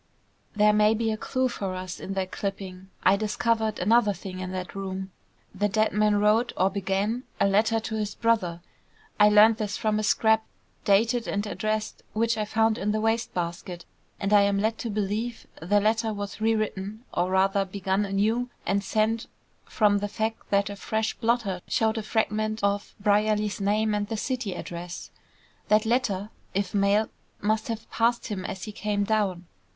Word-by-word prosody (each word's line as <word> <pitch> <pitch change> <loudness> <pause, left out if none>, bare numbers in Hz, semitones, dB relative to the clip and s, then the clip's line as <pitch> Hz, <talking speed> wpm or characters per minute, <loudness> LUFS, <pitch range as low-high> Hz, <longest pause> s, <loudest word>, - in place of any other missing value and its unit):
"There 210 0 +5
may 210 +1 +4
be 225 0 0
a - - 0
clue 255 +4 -1
for 195 -6 -4
us 185 0 -6
in 195 - -5
that 190 -1 -2
clipping. 190 -2 -5
I 190 - +6
discovered 220 +1 0
another 210 +2 +3
thing 185 0 -8
in 185 0 -4
that 185 -1 -5
room. 190 -1 -5 0.4
The 205 +2 0
dead 215 +2 +2
man 210 0 +3
wrote, 210 +3 +3
or 190 +2 +3
began, 200 +4 -1 0.2
a - - +4
letter 215 +3 +3
to 220 0 -4
his 210 -1 -3
brother. 190 -7 +1 0.6
I 210 0 +7
learned 215 +1 +6
this 210 -2 -3
from 215 -2 0
a - - -1
scrap, 220 +1 +3 0.4
dated 225 +4 +3
and 205 +1 -1
addressed, 215 +1 -2
which 230 +1 +1
I 215 -1 -1
found 220 +1 +1
in 210 +1 0
the 215 - 0
waste 225 +1 0
basket, 175 0 -4 0.3
and 200 +1 0
I 205 - +7
am 200 0 +2
led 220 +2 0
to 235 - -3
believe 215 +3 -2 0.2
the 205 +5 +3
letter 220 +2 +1
was 205 0 -6
re 225 +1 +3
written, 215 +1 -4
or 175 +1 +1
rather 195 +1 +3
begun 195 +1 -1
anew, 215 +5 0 0.2
and 200 +2 +1
sent, 220 +3 0 0.4
from 205 -2 +2
the 205 - -2
fact 220 +2 -3
that 200 0 +2
a - - -6
fresh 220 +2 -1
blotter 225 -6 0
showed 220 0 +1
a - - -3
fragment 215 0 -1
of 200 0 0
Brierly's 210 0 +1
name, 210 +2 +1
and 205 0 -1
the 225 0 -3
city 245 -4 -2
address. 175 +1 -7 0.6
That 215 +1 +4
letter, 220 -4 0 0.2
if 195 -2 -1
mailed, 205 +2 +2 0.3
must 215 +1 0
have 225 -2 -5
passed 235 +1 +1
him 195 -3 -3
as 190 - -5
he 215 - -5
came 205 -1 -1
down. 200 -4 0
210 Hz, 180 wpm, -26 LUFS, 195-220 Hz, 0.6 s, I